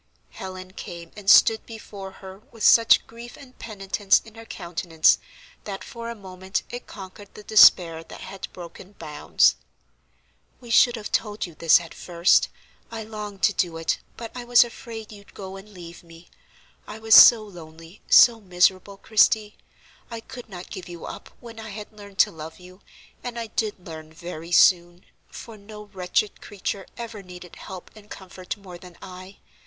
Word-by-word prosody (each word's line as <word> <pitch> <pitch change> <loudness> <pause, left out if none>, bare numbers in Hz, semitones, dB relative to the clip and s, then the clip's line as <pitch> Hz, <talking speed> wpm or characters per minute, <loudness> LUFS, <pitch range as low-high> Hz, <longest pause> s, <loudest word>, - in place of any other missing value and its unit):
Helen 185 -1 -9
came 170 -3 -9
and 200 -2 -4
stood 220 +1 +6
before 205 -4 -9 0.2
her 190 0 -10
with 225 - -9
such 230 -1 +6
grief 235 +1 -12
and 255 -2 -16
penitence 200 -2 0
in 225 - -15
her 225 0 -12
countenance 170 -2 +1 0.5
that 195 -2 -6
for 235 -2 -8
a 235 - -6
moment 190 -1 -5
it 245 0 -8
conquered 195 0 -11
the 210 - -11
despair 170 -6 +6
that - - -12
had 195 - -8
broken 180 +2 -12
bounds. 150 -6 +1 1.0
"We 240 -2 -11
should 240 +2 +5
have 215 -2 -7
told 210 -1 -1
you 170 - -12
this 165 +1 +4
at 170 -2 -11
first; 170 0 +2 0.4
I 225 -1 -6
longed 210 -2 -8
to - - +4
do 170 -3 -1
it, 165 - -1 0.2
but 230 -1 -8
I 250 - -7
was 240 0 +6
afraid 230 -2 -10
you'd 200 -1 -15
go 190 -1 -8
and 195 +2 -12
leave 175 -3 -12
me. 165 0 -17 0.6
I 210 - -8
was 220 0 +1
so 230 -2 +10
lonely, 165 -2 -13
so 235 -2 +7
miserable, 185 +1 +1
Christie. 215 0 +2 0.5
I 230 -1 -6
could 245 0 -11
not 180 -2 -10
give 185 -1 -8
you 175 -1 -9
up - - -9
when 230 -2 -12
I 220 0 -8
had 210 +1 -9
learned 200 -2 -14
to 210 - +2
love 160 -1 -10
you; 185 +2 -16 0.4
and 245 -1 -6
I 230 - -3
did 215 -4 -4
learn 155 -2 -10
very 170 0 -9
soon, 175 0 +4 0.2
for 225 -2 -11
no 210 +1 -12
wretched 195 0 -2
creature 195 -1 -5
ever 230 -3 -7
needed 180 -2 -12
help 185 -2 -10
and 210 -1 -16
comfort 185 +1 -8
more 185 -3 -12
than 180 -1 -14
I. 185 +1 -11
195 Hz, 175 wpm, -24 LUFS, 180-220 Hz, 1.0 s, so